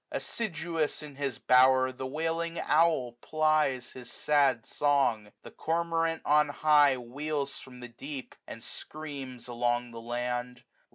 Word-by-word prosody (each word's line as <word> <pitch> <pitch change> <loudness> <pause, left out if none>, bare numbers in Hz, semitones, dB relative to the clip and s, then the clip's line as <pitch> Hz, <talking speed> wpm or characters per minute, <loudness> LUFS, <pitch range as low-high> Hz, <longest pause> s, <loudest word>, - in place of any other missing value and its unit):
As^siduous, 165 -8 -2
in 145 -2 -10
his 140 -4 -2
bower, 130 0 +5
the 130 0 -6
wailing 165 +3 -2
owl 155 -6 +3
piies 155 -5 +1
his 125 -2 -10
sad 140 -6 +2
song. 130 -8 +1
The - - -10
cormorant 165 0 -1
on 150 0 +4
high 145 -2 +4
144 120 -1 -11
Wheels 145 -1 -2
from 125 -3 -12
the 125 - -7
deep, 130 +3 -8
and - - -9
screams 140 -6 -7
along 120 0 -1
the 115 0 -8
land. 120 +1 -3
140 Hz, 135 wpm, -29 LUFS, 125-155 Hz, -, bower